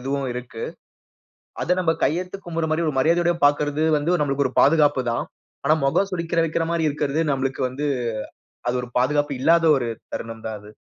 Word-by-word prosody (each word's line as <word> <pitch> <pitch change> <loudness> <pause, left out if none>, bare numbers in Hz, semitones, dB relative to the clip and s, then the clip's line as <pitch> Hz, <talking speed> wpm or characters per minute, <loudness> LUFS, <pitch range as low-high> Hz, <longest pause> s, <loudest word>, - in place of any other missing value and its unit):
இதுவும் 135 +1 -2
இருக்கு. 120 -2 -7 1.0
அத 180 - +2
நம்ப 165 -2 +2
கையெடுத்து 180 +5 -1
கும்பட்ற 165 -2 -2
மாரி 160 +1 +1
ஒரு 145 - -3
மரியாதையோட 170 +4 +3
பாக்கறது 145 +1 +1
வந்து, 170 +5 +1
நம்பளுக்கு 140 -1 +1
ஒரு 130 - -6
பாதுகாப்பு 145 -3 +4
தான். 120 - -1 0.4
ஆனா, 155 - +5
மொகம் 195 +8 +2
சுளிக்கிர 170 -1 0
வைக்கிற 165 +1 -1
மாரி 160 -2 +1
இருக்கிறது 150 +1 0
நம்மளுக்கு 135 -1 -2
வந்து, 140 +4 -4 0.8
அது 120 - +1
ஒரு 125 - -8
பாதுகாப்பு 145 +2 +1
இல்லாத 165 +2 +4
ஒரு 120 -2 -2 0.2
தருணம் 115 -1 -6
தான் 110 - -4
அது. 105 - -14
145 Hz, 170 wpm, -23 LUFS, 135-165 Hz, 1.0 s, ஆனா